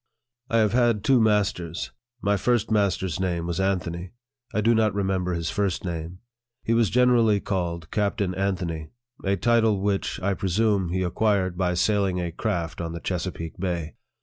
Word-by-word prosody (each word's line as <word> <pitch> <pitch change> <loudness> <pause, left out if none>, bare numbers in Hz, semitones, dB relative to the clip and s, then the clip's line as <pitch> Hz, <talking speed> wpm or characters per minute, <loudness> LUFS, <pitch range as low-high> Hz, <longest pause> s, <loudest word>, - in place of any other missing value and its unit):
I 115 - +2
have 110 -2 +3
had 120 -4 +3
two 130 -3 +4
masters. 95 -6 0 0.3
My 100 0 +3
first 115 +2 +1
master's 95 -5 +1
name 85 -3 -1
was 85 +1 -2
Anthony. 90 -2 -2 0.4
I 105 - -1
do 115 +3 +4
not 110 -3 +2
remember 95 -2 0
his 85 -1 -2
first 100 -3 -1
name. 85 +1 -5 0.4
He 115 - +1
was 115 -3 +3
generally 120 -4 +4
called 85 -4 -3
Captain 100 -2 0
Anthony 90 -5 -2 0.3
a 100 0 +2
title 115 -1 +3
which, 100 0 -1
I 100 +1 0
presume, 95 0 +1
he 95 +1 0
acquired 95 0 +1
by 90 -1 0
sailing 95 -1 +1
a 85 -1 -2
craft 85 +1 -2
on 85 -1 -4
the 85 - -5
Chesapeake 90 -1 -4
Bay. 85 -4 -2
95 Hz, 165 wpm, -25 LUFS, 85-105 Hz, 0.4 s, two